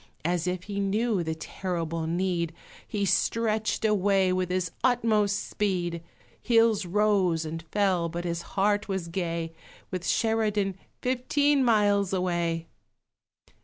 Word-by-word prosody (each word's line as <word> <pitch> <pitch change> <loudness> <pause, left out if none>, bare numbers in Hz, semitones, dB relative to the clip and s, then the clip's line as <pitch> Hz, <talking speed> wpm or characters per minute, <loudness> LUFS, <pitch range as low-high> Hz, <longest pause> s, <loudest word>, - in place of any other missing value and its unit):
As 175 0 0
if 180 0 -2
he 200 0 -4
knew 205 +1 +1
the 160 -1 -2
terrible 165 -1 -3
need, 170 -1 -1 0.3
He 205 -2 -1
stretched 220 +2 +1
away 195 -3 +3
with 185 -1 -1
his 180 -2 -1
utmost 215 -5 +2
speed; 175 -5 -1 0.4
Hills 225 -5 +3
rose 190 -4 +2
and 165 +1 -5
fell, 180 0 0
but 175 +1 -5
his 170 -1 -2 0.2
heart 205 +2 +2
was 190 -4 -3
gay, 165 -2 -3 0.4
With 185 -2 -3
Sheridan 210 -2 +1 0.3
fifteen 270 +3 +2
miles 205 -4 +3
away! 170 -3 0
190 Hz, 125 wpm, -27 LUFS, 170-210 Hz, 0.4 s, away